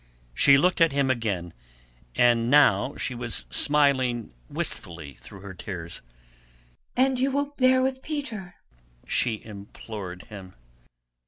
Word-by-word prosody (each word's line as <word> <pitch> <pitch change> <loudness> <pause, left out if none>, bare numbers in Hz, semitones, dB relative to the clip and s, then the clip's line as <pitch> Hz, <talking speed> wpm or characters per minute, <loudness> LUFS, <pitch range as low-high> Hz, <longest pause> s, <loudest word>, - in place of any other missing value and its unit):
She 140 - +6
looked 180 +4 +2
at 165 -3 +5
him 140 -2 +2
again, 100 -9 -2 0.6
and 120 -1 +3
now 135 -3 +4
she 130 - -3
was 120 -1 -2
smiling 130 - +2 0.2
wistfully 80 -5 -4
through 80 +10 -13
her 100 -1 -8
tears. 85 -3 -6 1.0
"And 260 0 +3
you 265 +2 +2
will 285 +1 -1
bear 255 -1 +4
with 260 0 -1
Peter?" 235 - -5 0.5
she 115 -4 -1
implored 100 -3 -8
him. 95 -3 -11
120 Hz, 120 wpm, -26 LUFS, -, 1.0 s, She